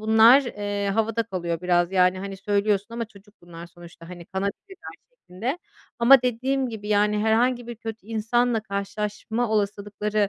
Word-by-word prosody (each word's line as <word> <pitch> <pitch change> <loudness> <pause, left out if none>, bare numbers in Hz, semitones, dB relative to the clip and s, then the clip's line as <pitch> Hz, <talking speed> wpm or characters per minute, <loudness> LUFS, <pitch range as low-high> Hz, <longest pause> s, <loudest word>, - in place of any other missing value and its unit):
bunlar, 220 +5 +6
eee, 205 -4 -3
havada 225 +1 0
kalıyor 175 -6 -4
biraz. 175 0 +1
Yani 185 0 +3
hani 195 +1 -6
söylüyorsun 200 0 0
ama 235 - -2
çocuk 205 -1 -19
bunlar 170 0 -11
sonuçta, 170 -1 -14
hani, 175 -2 -10
kanabilirler 200 - -6 0.2
şeklinde, 255 - -5 0.4
ama 245 +2 +7
dediğim 260 +2 -1
gibi 215 -2 -7
yani 210 0 +2
herhangi 235 +3 +1
bir 240 - -7
kötü 225 -2 -8
insanla 230 +1 0
karşılaşma 210 +3 -3
olasılıkları 205 0 -1
210 Hz, 145 wpm, -24 LUFS, 195-230 Hz, 0.4 s, ama